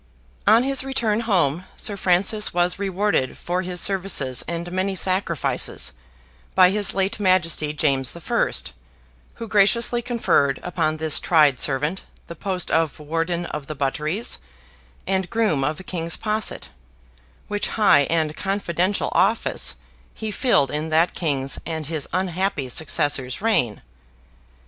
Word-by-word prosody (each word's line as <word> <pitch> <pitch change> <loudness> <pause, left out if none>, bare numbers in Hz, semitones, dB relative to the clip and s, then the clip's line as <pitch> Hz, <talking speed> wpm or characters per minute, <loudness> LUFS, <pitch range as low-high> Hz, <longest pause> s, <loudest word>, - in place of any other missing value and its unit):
On 230 +2 +6
his 270 0 +1
return 235 -5 -1
home 180 -7 +1
Sir 205 - -3
Francis 195 +2 +2
was 175 +2 +1
rewarded 195 -8 -1
for 180 +1 -2
his 180 -1 -3
services 180 -10 +2
and 170 +1 -4
many 190 +1 -1
sacrifices, 185 -4 0 0.6
by 185 -1 +6
his 205 0 +1
late 195 +3 0
Majesty 170 -6 +2
James 140 -4 0
the 170 - -10
First, 160 - -1 0.6
who 230 - -7
graciously 225 +3 +3
conferred 230 - +1
upon 155 -3 -1
this 155 -1 +2
tried 150 -6 +3
servant 150 +7 -1 0.2
the 170 - -9
post 185 0 -3
of 160 -3 +1
Warden 165 +3 -2
of 150 -4 -6
the 155 - -6
Butteries 150 - -1 0.7
and 190 -1 -1
Groom 215 -12 +1
of 150 +3 -1
the - - -9
King's 170 -3 -2
Posset, 215 - -1 0.8
which 205 0 -2
high 145 -10 +5
and 160 -2 0
confidential 195 -1 -1
office - - +1 0.4
he 220 -1 -5
filled 175 - +2
in 150 +2 -3
that 160 +2 +2
king's 140 -5 -1
and 160 -2 -5
his 155 -1 -2
unhappy 185 -5 -2
successor's 135 -2 +1
reign. 190 - 0
175 Hz, 135 wpm, -22 LUFS, 150-200 Hz, 0.8 s, On